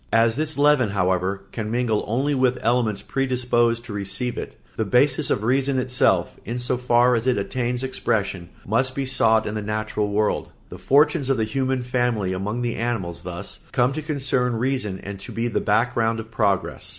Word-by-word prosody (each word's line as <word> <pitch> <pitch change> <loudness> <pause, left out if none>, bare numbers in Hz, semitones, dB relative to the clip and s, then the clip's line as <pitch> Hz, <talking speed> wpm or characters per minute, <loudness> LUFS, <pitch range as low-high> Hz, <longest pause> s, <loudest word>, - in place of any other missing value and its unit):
As 115 0 +3
this 155 +1 -2
leaven, 145 -5 +4
however, 95 0 0
can 110 -2 -4
mingle 115 -2 0
only 135 +6 0
with 130 -2 +2
elements 115 -3 +1
predisposed 120 -3 0
to 115 - -7
receive 100 +5 -2
it, - - -6 0.2
the 110 - 0
basis 135 +6 +2
of 105 - 0
reason 135 +3 +1
itself, 125 0 +1
in 120 +4 -4
so 125 +1 0
far 125 0 +3
as 115 +1 0
it 125 - +3
attains 125 +4 -2
expression, 100 -9 -2 0.2
must 130 +5 0
be 140 - -1
sought 115 -4 +3
in 105 - -3
the 110 - -3
natural 105 0 -2
world. 105 +1 0 0.2
The - - -9
fortunes 145 0 +3
of 135 - +2
the 110 - +1
human 130 +3 -1
family 120 -6 0
among 105 +6 -3
the 120 - -2
animals 100 -8 -3
thus 85 -1 -6
come 125 +2 +2
to 155 - -3
concern 135 -5 0
reason 120 -5 -1
and 100 0 -7
to - - -8
be 115 +1 -1
the 120 - -1
background 115 +1 +1
of 110 0 -8
progress. 100 -4 0
120 Hz, 185 wpm, -23 LUFS, 105-130 Hz, 0.2 s, leaven